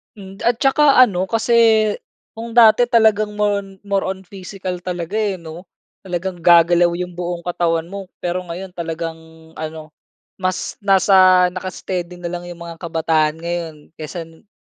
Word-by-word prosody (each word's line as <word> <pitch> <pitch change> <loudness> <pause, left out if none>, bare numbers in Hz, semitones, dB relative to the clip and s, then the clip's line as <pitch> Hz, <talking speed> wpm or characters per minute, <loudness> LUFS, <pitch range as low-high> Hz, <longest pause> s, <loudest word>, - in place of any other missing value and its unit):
Hmm, 195 -1 -12
at 240 - +3
tsaka 280 +1 +4
ano, 190 -5 -1
kasi, 225 +3 -1 0.8
kung 230 +1 -8
dati 235 +1 +6
talagang, 215 -3 +2
more 210 -1 +1
on 200 - -10 0.2
more 200 -1 -1
on 190 0 -5
physical 185 -1 -7
talaga, 175 0 -5
eh, 205 -3 0
'no? 170 +1 -11 0.3
Talagang 180 -1 -5
gagalaw 175 0 +5
yung 180 0 -4
buong 175 0 -5
katawan 170 -2 0
mo. 200 -1 -7 0.2
Pero, 175 +1 -1
ngayon 180 +3 -7
talagang 165 -1 -5 0.4
ano, 155 0 -7 0.5
mas 185 0 -3
nasa 185 -2 +5
naka-steady 180 -1 -5
na 175 -1 -6
lang 175 0 -6
yung 175 -1 -9
mga 170 -1 -9
kabataan 160 -2 0
ngayon, 170 -2 -4 0.2
kaysa 165 +2 -6
nung 165 +5 -19
180 Hz, 150 wpm, -19 LUFS, 170-195 Hz, 0.8 s, dati